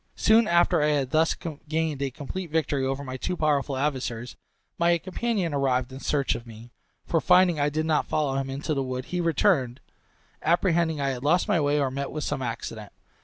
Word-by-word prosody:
Soon 220 0 +4
after 170 -2 +3
I 150 - +3
had 140 -4 0
thus 160 +1 +3 0.3
gained 160 -3 -1
a 140 - 0
complete 155 +7 -6
victory 150 -3 0
over 135 +1 -2
my 130 -1 -6
two 180 +7 -3
powerful 145 -3 +1
adversaries, 130 -4 -3 0.4
my 170 0 +4
companion 185 -1 -2
arrived 130 -2 0
in 135 - -7
search 140 -1 0
of 120 - -7
me; 115 +1 -12 0.3
for 165 - +1
finding 180 -3 +4
I 145 0 +2
did 155 +2 -2
not 155 -2 +1
follow 150 -3 0
him 135 0 -2
into 140 +4 -3
the 135 - -1
wood, 130 -1 -4
he 180 -1 -2
returned, 155 -6 +1 0.6
apprehending 170 -2 +2
I 140 -1 0
had 130 -1 -4
lost 175 +7 +2
my 195 -7 +2
way 145 0 +2
or 135 -2 0
met 140 +1 -3
with 155 0 -4
some - - -2
accident. 115 -3 -5
145 Hz, 200 wpm, -26 LUFS, 135-165 Hz, 0.6 s, Soon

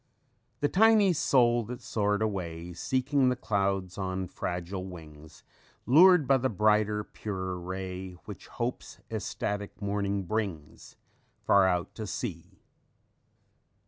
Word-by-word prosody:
_ 145 - +3
"_The - - -12
tiny 210 -2 +5
soul 120 -6 +3
that 120 +2 -7
soared 105 0 0
away, 90 -5 -4
Seeking 130 - +1
the 125 - +1
clouds 100 -5 -1
on 95 -1 -2
fragile 90 +2 -4
wings, 80 -4 -12 0.4
Lured 170 - +7
by 135 - +5
the 130 +1 0
brighter, 105 0 +2
purer 95 -4 -5
ray 95 +1 -6
Which 100 -3 -9
hope's 120 +1 -5
ecstatic 105 0 -4
morning 100 -1 -1
brings 95 -7 -4 0.5
Far 100 -1 +5
out 90 +4 -2
at 110 -2 -4
sea. 95 - -6
100 Hz, 120 wpm, -29 LUFS, 95-120 Hz, 0.5 s, Lured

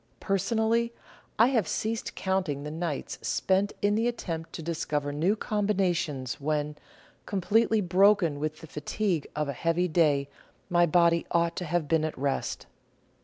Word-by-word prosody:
Personally, 220 +4 +1 0.5
I 230 +3 +6
have 230 - +1
ceased 225 +1 -2
counting 185 -7 -1
the 150 - -5
nights 160 -2 -4
spent 195 +2 +1
in 205 0 +3
the 225 +3 +1
attempt 165 -9 -4
to 165 - -6
discover 150 -3 -2
new 170 +8 +2
combinations, 180 - -1
when, 150 0 -1 0.5
completely 215 +3 +2
broken 185 -4 +3
with 155 +1 -3
the - - -8
fatigue 160 +3 -2
of 150 0 -1
a 140 - -2
heavy 165 +5 +1
day, 150 -4 +2 0.4
my 175 0 +4
body 170 0 +3
ought 170 -1 +1
to 180 - -3
have 170 -2 -1
been 160 0 +2
at 155 - -3
rest. 140 +1 -2
170 Hz, 150 wpm, -28 LUFS, 150-200 Hz, 0.5 s, I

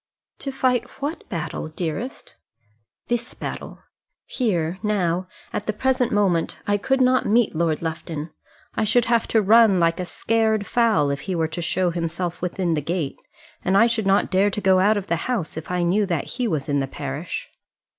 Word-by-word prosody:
"To 275 - -4
fight 255 -3 +1
what 290 +4 -4
battle, 165 -3 -4
dearest?" 170 - -5 0.7
"This 240 0 -2
battle. - - -7 0.4
Here, 180 - -1
now, 185 -4 0 0.3
at 205 - -3
the 215 - +1
present 255 +2 +1
moment, 190 -5 +1
I 205 -1 +2
could 265 +6 +1
not 255 0 +3
meet 230 +2 +3
Lord 160 -1 0
Lufton. 160 -1 -4 0.4
I 220 - 0
should 230 +3 +3
have 235 -1 +2
to 220 -2 +2
run 215 -2 +6
like 165 0 +2
a 180 - -2
scared 220 +3 +1
fowl 215 -14 +2
if 140 0 -3
he 185 - 0
were 165 -1 +1
to 175 - -5
show 175 +1 +1
himself 170 +1 -3
within 180 -1 -1
the 150 - 0
gate; 160 -1 -3 0.4
and 190 +1 +3
I 230 - +7
should 230 -3 0
not 195 0 +3
dare 195 +2 +4
to 205 - -3
go 190 -2 +4
out 205 +3 +4
of 200 - -3
the 170 - 0
house, 215 -11 -2
if 160 0 -7
I 180 -1 0
knew 195 +4 +2
that 170 -6 -2
he 250 - -1
was 155 -8 -2
in 145 -1 +1
the 135 - -1
parish." - - -5
190 Hz, 190 wpm, -23 LUFS, 170-225 Hz, 0.7 s, I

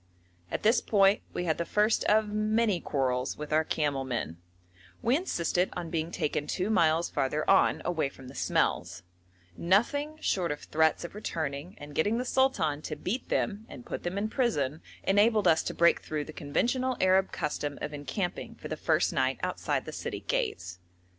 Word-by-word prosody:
At - - -3
this 220 +3 +4
point 200 -1 +4
we - - -3
had 160 -1 0
the - - +1
first 210 +5 +2
of 215 0 +4
many 215 -1 +1
quarrels 130 -2 -1
with 150 0 -5
our 155 +1 +4
camel 145 -4 -1
men; 120 -10 -3 0.7
we 240 +3 +3
insisted 180 - 0
on 175 -2 -5
being 165 -1 -1
taken 150 -3 -2
two 190 +3 -1
miles 165 -4 +3
farther 150 +3 -1
on, 195 - +4
away 160 -5 0
from 135 -1 -13
the 130 - -10
smells; 90 -8 0 0.5
nothing 285 - +1
short 180 - 0
of 145 - -4
threats 160 +1 +1
of 170 - -7
returning 160 -4 -4
and 145 0 -10
getting 205 +10 +1
the 250 - -2
sultan 185 - +1
to 155 - -5
beat 195 - -4
them 215 0 -1
and 245 - -10
put - - -5
them 175 +2 -3
in 205 +2 0
prison 160 - 0 0.2
enabled 205 +1 +4
us 160 -1 +5
to - - -4
break 170 0 +4
through 150 -1 -3
the 155 - -9
conventional 250 - 0
Arab 190 +1 +3
custom 150 -2 -3
of 150 - -5
encamping 175 +6 -4
for - - -9
the - - -3
first - - +1
night - - +1
outside - - -1
the - - -6
city - - -5
gates. 90 0 -2
170 Hz, 180 wpm, -29 LUFS, 150-210 Hz, 0.7 s, us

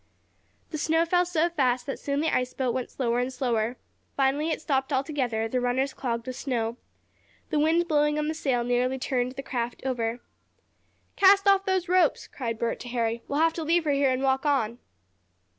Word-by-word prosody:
The 310 - -3
snow 325 +2 +2
fell 355 +1 +2
so 340 -1 +2
fast 255 -6 +1
that 275 - -4
soon 280 0 -1
the 320 - +1
ice 250 0 -1
boat 255 -3 0
went 255 -1 -3
slower 240 -2 -1
and 250 +1 -1
slower. 245 -2 -1 0.4
Finally 280 +3 +1
it 320 - -1
stopped 270 -2 -1
altogether, 260 -5 -1
the 250 +2 -1
runners 260 +2 0
clogged 235 -2 -3
with 255 - -5
snow. 235 -3 -2 0.7
The 300 - +2
wind 330 +3 +2
blowing 295 -1 +2
on 300 0 -1
the 315 - -1
sail 265 -6 0
nearly 245 +2 0
turned 255 -1 -1
the 275 - -7
craft 240 -2 -4
over. 240 -2 -1 1.0
"Cast 395 +1 +5
off 395 0 +5
those 375 -2 +1
ropes!" 360 -3 +2
cried 230 -4 -5
Bert 230 +1 -2
to 245 - -8
Harry. 235 -1 -1
"We'll 285 +2 0
have 325 0 +3
to 325 - -4
leave 335 +2 +2
her 300 - +1
here 280 -1 +3
and 260 +1 0
walk 265 0 +2
on." 245 -6 0
265 Hz, 195 wpm, -26 LUFS, 245-310 Hz, 1.0 s, Cast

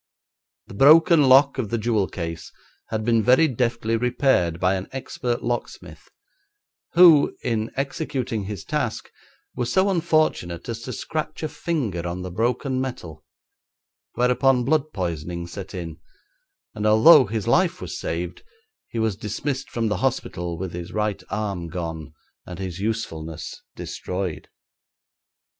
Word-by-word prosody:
The - - -12
broken 155 - +6
lock 135 +1 +6
of 110 -5 -2
the 115 - 0
jewel 110 -3 +1
case 85 -2 -6 0.4
had 110 -1 -2
been 115 -1 +3
very 130 +8 +5
deftly 120 -3 -1
repaired 115 - +1
by 90 +1 +2
an 95 0 -3
expert 125 -2 -3
locksmith, 120 0 -5 0.8
who 170 -4 +6
in 115 -2 -1
executing 135 -6 -3
his 100 -2 -6
task - - -3 0.4
was 120 -1 -2
so 195 +1 +3
unfortunate 155 - 0
as 115 -1 -5
to 125 - -6
scratch 155 +3 -4
a - - 0
finger 120 - -3
on 90 +1 -4
the 90 - -6
broken 125 +6 -1
metal, 85 -13 -6 0.9
whereupon 125 +1 +3
blood 155 +1 +1
poisoning 85 -1 -4
set 95 +3 -8
in, 85 -3 -6 0.7
and 105 +1 -1
although 125 +7 +8
his 105 -1 -3
life - - +2
was - - -6
saved, 85 +1 -4 0.5
he - - -6
was 110 -3 0
dismissed 130 +7 -4
from 115 -1 -1
the 105 - 0
hospital 85 -1 -2
with 95 0 -5
his 85 0 -6
right 105 -2 -1
arm 100 -5 -3
gone 80 -3 -5 0.4
and 90 - -7
his 95 -2 -5
usefulness 80 -8 -4
destroyed. 90 -3 -5
110 Hz, 140 wpm, -23 LUFS, 90-130 Hz, 0.9 s, although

